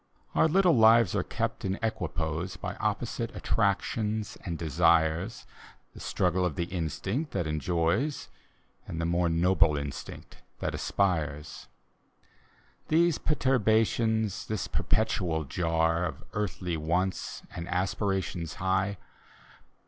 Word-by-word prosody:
Our - - +4
little 180 0 +4
lives 115 -3 +6
are - - +2
kept - - -3
in 95 0 0
equipoise 85 -5 -2
By - - -4
opposite - - -2
attractions 110 -1 0
and 85 -4 -3
desires: 80 - +2 0.5
The - - -12
struggle 90 0 0
of 90 -5 0
the 85 - 0
instinct 90 - -3
that 95 -4 0
enjoys, 85 - 0 0.6
And 80 - -5
the 85 - 0
more 85 0 +1
noble 85 -2 +3
instinct 70 -1 -7 0.2
that - - -3
aspires. 80 -7 -1 1.2
These 165 0 +3
perturbations, 110 - +1
this 110 -4 -2
perpetual 90 -7 0
jar 80 +3 +1
Of - - -8
earthly 90 -4 -2
wants 90 +5 -1
and 85 0 -5
aspirations 95 -2 -1
high. 95 +1 0
90 Hz, 110 wpm, -29 LUFS, 80-110 Hz, 1.2 s, lives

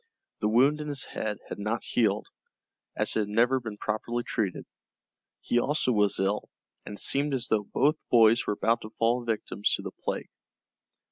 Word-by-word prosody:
The 105 - +1
wound 135 +7 +4
in 150 - -5
his 145 -3 -1
head 105 -2 -4
had - - -6
not 110 +3 -2
healed, 105 -3 +1 0.7
as - - 0
it - - +2
had 105 - 0
never 120 +5 +3
been 110 -4 -7
properly 115 +3 -2
treated. 105 -7 -2 0.8
He 120 - +1
also 140 0 +1
was 105 -3 +2
ill, 100 +2 0 0.4
and 105 - -6
it - - -7
seemed 140 0 +1
as 125 -2 -1
though 105 -2 +1
both 145 +9 +2
boys 115 -1 +5
were - - +1
about 115 +3 +1
to 110 - -8
fall 120 +2 +2
victims 110 -3 -1
to - - -7
the - - -5
plague. - - -5
115 Hz, 185 wpm, -28 LUFS, 105-125 Hz, 0.8 s, boys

